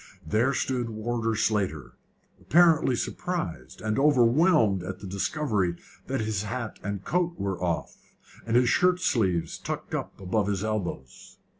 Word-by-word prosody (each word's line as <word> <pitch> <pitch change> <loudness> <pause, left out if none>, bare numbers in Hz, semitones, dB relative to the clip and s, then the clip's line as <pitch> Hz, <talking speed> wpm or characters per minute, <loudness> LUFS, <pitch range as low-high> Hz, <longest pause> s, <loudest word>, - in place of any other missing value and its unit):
There 110 +11 +2
stood 125 -3 -1
Warder 115 +1 -2
Slater, 95 - -1 0.5
apparently 160 -6 +4
surprised 85 - -4
and 110 +1 -1
overwhelmed 130 - +4
at 90 +1 -5
the 100 - -10
discovery 100 - -1 0.3
that 135 -2 -1
his 110 -2 -1
hat 115 +2 -5
and 100 -1 -4
coat 175 +1 0
were 95 -2 -3
off, 85 -2 -2 0.5
and 115 0 -1
his 125 0 +5
shirtsleeves 115 - +2
tucked - - -5
up - - -4
above 100 +2 0
his 100 -1 -1
elbows. 105 -11 -5
110 Hz, 135 wpm, -27 LUFS, 95-130 Hz, 0.5 s, his